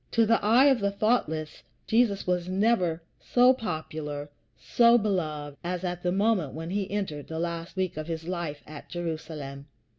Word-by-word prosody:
To 230 Hz, -1 st, +4 dB
the 230 Hz, 0 st, +2 dB
eye 235 Hz, +6 st, +6 dB
of 270 Hz, -4 st, +5 dB
the 200 Hz, -1 st, +1 dB
thoughtless, 200 Hz, -7 st, -1 dB, 0.2 s
Jesus 220 Hz, -3 st, +2 dB
was 180 Hz, -1 st, -1 dB
never 185 Hz, -5 st, +1 dB, 0.2 s
so 250 Hz, +1 st, +5 dB
popular, 155 Hz, -, -5 dB, 0.3 s
so 235 Hz, 0 st, +5 dB
beloved, 155 Hz, -9 st, -2 dB
as 180 Hz, +1 st, -3 dB
at 175 Hz, -1 st, -3 dB
the 180 Hz, -, 0 dB
moment 195 Hz, -7 st, +1 dB
when 165 Hz, +2 st, -5 dB
he 195 Hz, -1 st, -1 dB
entered 190 Hz, -8 st, -3 dB
the 160 Hz, -, -5 dB
last 170 Hz, +1 st, -4 dB
week 185 Hz, -4 st, -2 dB
of 155 Hz, 0 st, -4 dB
his 165 Hz, -1 st, -5 dB
life 170 Hz, -5 st, -4 dB
at 150 Hz, -1 st, -11 dB
Jerusalem. 155 Hz, -5 st, -5 dB
175 Hz, 170 wpm, -27 LUFS, 155-210 Hz, 0.3 s, eye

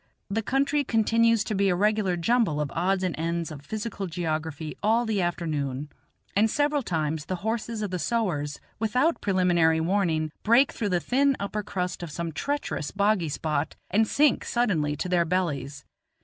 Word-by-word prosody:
The 220 Hz, +3 st, 0 dB
country 280 Hz, +5 st, +1 dB
continues 230 Hz, -2 st, +3 dB
to 215 Hz, -, -3 dB
be 200 Hz, -1 st, +2 dB
a 180 Hz, -, +2 dB
regular 205 Hz, -2 st, +1 dB
jumble 200 Hz, -4 st, +2 dB
of 150 Hz, -2 st, -2 dB
odds 185 Hz, +3 st, +1 dB
and 180 Hz, -3 st, 0 dB
ends 170 Hz, 0 st, -2 dB
of 145 Hz, -2 st, -8 dB
physical 210 Hz, +2 st, -4 dB
geography 160 Hz, -2 st, -3 dB
all 225 Hz, +3 st, +3 dB
the 215 Hz, -3 st, 0 dB
afternoon, 150 Hz, -5 st, -2 dB, 0.4 s
and 215 Hz, +3 st, +4 dB
several 290 Hz, +3 st, +1 dB
times 155 Hz, -, -2 dB
the 185 Hz, -, -2 dB
horses 225 Hz, 0 st, -2 dB
of 205 Hz, -, -3 dB
the 180 Hz, -, -2 dB
sowars, 170 Hz, -11 st, -1 dB, 0.2 s
without 250 Hz, +9 st, +1 dB
preliminary 175 Hz, -5 st, +3 dB
warning, 160 Hz, -3 st, +1 dB
break 240 Hz, +5 st, +4 dB
through 210 Hz, -, -2 dB
the 180 Hz, -2 st, +2 dB
thin 275 Hz, +7 st, +2 dB
upper 200 Hz, +1 st, -2 dB
crust 180 Hz, -4 st, -3 dB
of 175 Hz, -, -5 dB
some 170 Hz, +2 st, -4 dB
treacherous 280 Hz, -, -2 dB
boggy 200 Hz, -4 st, +1 dB
spot 150 Hz, 0 st, -2 dB, 0.2 s
and 220 Hz, +3 st, +3 dB
sink 295 Hz, +2 st, +3 dB
suddenly 170 Hz, -12 st, 0 dB
to 155 Hz, -, -3 dB
their 180 Hz, -1 st, +3 dB
bellies. 145 Hz, -6 st, -2 dB
185 Hz, 170 wpm, -26 LUFS, 160-220 Hz, 0.4 s, and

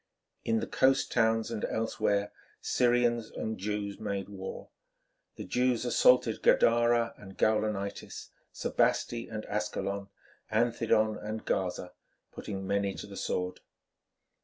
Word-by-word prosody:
In 115 Hz, 0 st, +1 dB
the -, -, -1 dB
coast 135 Hz, +1 st, +2 dB
towns 115 Hz, -1 st, +2 dB
and 110 Hz, -2 st, -4 dB
elsewhere 105 Hz, -2 st, 0 dB, 0.3 s
Syrians 120 Hz, -2 st, +2 dB
and 110 Hz, -2 st, -4 dB
Jews 100 Hz, 0 st, -3 dB
made 100 Hz, 0 st, -3 dB
war. 95 Hz, -2 st, -7 dB, 0.7 s
The -, -, -6 dB
Jews 125 Hz, -1 st, +1 dB
assaulted 120 Hz, -2 st, +4 dB
Gadara 120 Hz, 0 st, +4 dB
and 95 Hz, -2 st, -12 dB
Gaulonitis, 105 Hz, -2 st, -1 dB, 0.2 s
Sebaste 120 Hz, 0 st, 0 dB
and 110 Hz, 0 st, -5 dB
Ascalon, 100 Hz, -1 st, -3 dB, 0.4 s
Anthedon 110 Hz, -1 st, +2 dB
and 110 Hz, +1 st, -5 dB
Gaza, 90 Hz, -1 st, -2 dB, 0.4 s
putting 95 Hz, -2 st, -6 dB
many 100 Hz, 0 st, 0 dB
to -, -, -7 dB
the 100 Hz, -1 st, -10 dB
sword. 90 Hz, -1 st, -2 dB
110 Hz, 115 wpm, -30 LUFS, 100-115 Hz, 0.7 s, assaulted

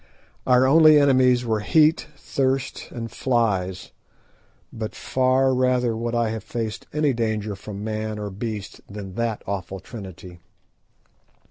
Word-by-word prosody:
Our 125 Hz, 0 st, +5 dB
only 155 Hz, +2 st, +7 dB
enemies 130 Hz, -3 st, +4 dB
were 110 Hz, -2 st, 0 dB
heat, 155 Hz, +9 st, +3 dB
thirst, 135 Hz, -1 st, -2 dB
and 115 Hz, -2 st, -6 dB
flies, 100 Hz, -8 st, -1 dB, 0.8 s
but 110 Hz, -1 st, -5 dB
far 130 Hz, +1 st, +2 dB
rather 125 Hz, -2 st, +1 dB
would 115 Hz, +1 st, -3 dB
I 115 Hz, -1 st, +1 dB
have 110 Hz, -2 st, -4 dB
faced 110 Hz, -2 st, -5 dB
any 150 Hz, -2 st, +1 dB
danger 110 Hz, -3 st, -2 dB
from 100 Hz, +1 st, -8 dB
man 110 Hz, 0 st, -3 dB
or 105 Hz, -1 st, -5 dB
beast 105 Hz, 0 st, -6 dB
than 100 Hz, -2 st, -8 dB
that 115 Hz, 0 st, -2 dB
awful 95 Hz, 0 st, -4 dB
trinity. 95 Hz, -5 st, -10 dB
115 Hz, 130 wpm, -23 LUFS, 105-130 Hz, 0.8 s, only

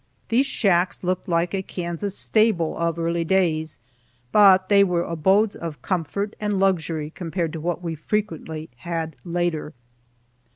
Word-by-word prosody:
These 255 Hz, +5 st, +3 dB
shacks 185 Hz, -8 st, +1 dB
looked 185 Hz, +2 st, -2 dB
like 170 Hz, +1 st, +1 dB
a 195 Hz, -, 0 dB
Kansas 180 Hz, +2 st, -4 dB
stable 215 Hz, -7 st, +2 dB
of 170 Hz, 0 st, -1 dB
early 170 Hz, 0 st, 0 dB
days, 160 Hz, -3 st, +1 dB, 0.5 s
but 190 Hz, -1 st, +6 dB
they 200 Hz, 0 st, +6 dB
were 175 Hz, -3 st, +1 dB
abodes 190 Hz, +7 st, +2 dB
of 165 Hz, -3 st, -7 dB
comfort 195 Hz, +3 st, -2 dB
and 210 Hz, -2 st, -1 dB
luxury 165 Hz, -5 st, 0 dB
compared 170 Hz, -1 st, -3 dB
to 160 Hz, -, -5 dB
what 175 Hz, +1 st, -2 dB
we 165 Hz, -1 st, -3 dB
frequently 160 Hz, -2 st, -3 dB
had 165 Hz, +4 st, -4 dB
later. 170 Hz, -4 st, -2 dB
175 Hz, 140 wpm, -23 LUFS, 165-195 Hz, 0.5 s, but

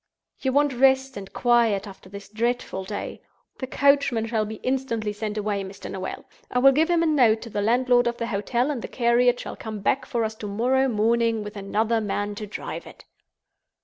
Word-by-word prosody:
You 265 Hz, -, 0 dB
want 285 Hz, +1 st, +2 dB
rest 265 Hz, +1 st, +3 dB
and 195 Hz, -1 st, -8 dB
quiet 230 Hz, -5 st, +2 dB
after 190 Hz, -2 st, -12 dB
this 200 Hz, 0 st, -9 dB
dreadful 225 Hz, -3 st, -2 dB
day. 205 Hz, +1 st, -6 dB, 0.4 s
The 260 Hz, -, -4 dB
coachman 280 Hz, -4 st, +2 dB
shall 220 Hz, -1 st, 0 dB
be 220 Hz, -, -6 dB
instantly 240 Hz, -5 st, -1 dB
sent 210 Hz, 0 st, -4 dB
away, 205 Hz, -1 st, -1 dB
Mr. 195 Hz, +1 st, -8 dB
Noel. 190 Hz, -1 st, -6 dB, 0.2 s
I -, -, -2 dB
will 270 Hz, +2 st, +7 dB
give 315 Hz, +5 st, +2 dB
him 340 Hz, -1 st, +3 dB
a -, -, +2 dB
note 245 Hz, -8 st, +3 dB
to 230 Hz, -, -9 dB
the 205 Hz, -, -1 dB
landlord 245 Hz, +2 st, +3 dB
of 235 Hz, -, -2 dB
the 230 Hz, -, -2 dB
hotel, 235 Hz, +5 st, -1 dB
and 260 Hz, -5 st, -4 dB
the -, -, -5 dB
carriage 245 Hz, 0 st, +2 dB
shall -, -, -7 dB
come 215 Hz, -2 st, -6 dB
back 260 Hz, +6 st, 0 dB
for 235 Hz, -1 st, -1 dB
us 220 Hz, 0 st, -2 dB
to 210 Hz, -, -6 dB
morrow 250 Hz, +6 st, +1 dB
morning, 230 Hz, -1 st, +1 dB
with 210 Hz, 0 st, -8 dB
another 215 Hz, +3 st, 0 dB
man 205 Hz, 0 st, -2 dB
to 210 Hz, +1 st, -7 dB
drive 205 Hz, -, -6 dB
it." -, -, -14 dB
230 Hz, 205 wpm, -24 LUFS, 210-255 Hz, 0.4 s, will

